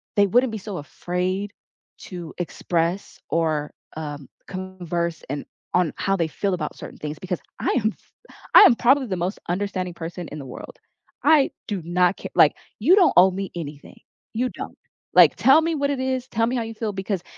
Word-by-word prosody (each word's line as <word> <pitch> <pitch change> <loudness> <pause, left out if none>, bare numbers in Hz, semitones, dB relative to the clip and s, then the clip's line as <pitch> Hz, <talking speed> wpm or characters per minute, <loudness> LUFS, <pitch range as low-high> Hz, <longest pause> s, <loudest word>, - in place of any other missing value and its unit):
they 205 - +5
wouldn't 245 +4 +3
be 220 - -4
so 200 -2 -6
afraid 180 +6 -3 0.5
to 175 -3 -8
express 170 +3 -2
or, 155 -3 0 0.3
um, 145 -3 -6 0.2
converse 175 -3 -4
and 145 +1 -4 0.3
on 180 -4 +3
how 195 - +1
they 170 -4 0
feel 195 +5 -2
about 155 -4 -4
certain - - -10
things, 150 0 -5
because 180 -2 -4 0.2
I - - 0
am 215 - +3
f - - -31 0.4
I - - +12
am 265 - +7
probably 260 +3 +3
the 190 - -2
most 180 +4 -2
understanding 185 -1 -2
person 170 +1 -6
in 150 - -7
the 140 - -8
world. 125 - -9 0.5
I 295 -4 +5 0.2
do 205 -5 -3
not 180 +2 +2
ca - - -7
like, - - +6 0.2
"You 305 - +6
don't 380 -4 +5
owe 185 +2 +8
me 195 +1 -4
anything. 150 -4 -8 0.3
You 250 +3 0
don't. - - -8 0.4
Like, - - +7
tell 270 +4 +6
me 330 +1 0
what 280 -1 0
it 280 - -2
is, 260 -1 -1
tell 230 0 +1
me 250 - -1
how - - 0
you 225 0 -6
feel," 215 -1 -3
because 190 -1 -3
185 Hz, 195 wpm, -23 LUFS, 170-220 Hz, 0.5 s, I